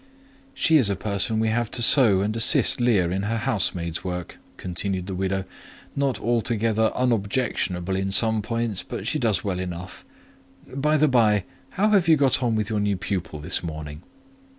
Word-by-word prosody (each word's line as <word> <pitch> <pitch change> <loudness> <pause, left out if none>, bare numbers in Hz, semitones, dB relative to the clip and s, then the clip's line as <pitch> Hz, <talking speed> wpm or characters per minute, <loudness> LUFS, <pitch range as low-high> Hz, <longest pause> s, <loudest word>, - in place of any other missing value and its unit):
"She 160 -10 +3
is 125 -8 +3
a 100 - 0
person 100 +3 -1
we 110 0 +1
have 115 0 -1
to 120 - -1
sew 115 -7 +6
and 105 +2 -2
assist 115 +2 +3
Leah 100 -8 +2
in 95 +2 -2
her 110 +3 -2
housemaid's 95 -8 -1
work," 90 -2 -6 0.2
continued 90 +1 -3
the 95 - -5
widow; 95 +1 -2 0.5
"not 140 -3 -1
altogether 115 -2 0
unobjectionable 100 -6 -1
in 95 0 -2
some 110 +1 +3
points, 115 -2 -2
but 100 - -7
she 150 +6 -1
does 110 -8 0
well 95 -3 -3
enough. 90 0 -7 0.7
By 150 +3 +1
the 155 +1 +3
bye, 110 -7 +3 0.3
how 210 +3 +3
have 200 -5 +3
you 160 - +6
got 135 -2 +2
on 120 -3 0
with 105 -2 -1
your 110 -1 -2
new 100 -1 0
pupil 90 -5 -4
this 75 - -2
morning?" 80 -2 -7
105 Hz, 175 wpm, -23 LUFS, 95-120 Hz, 0.7 s, sew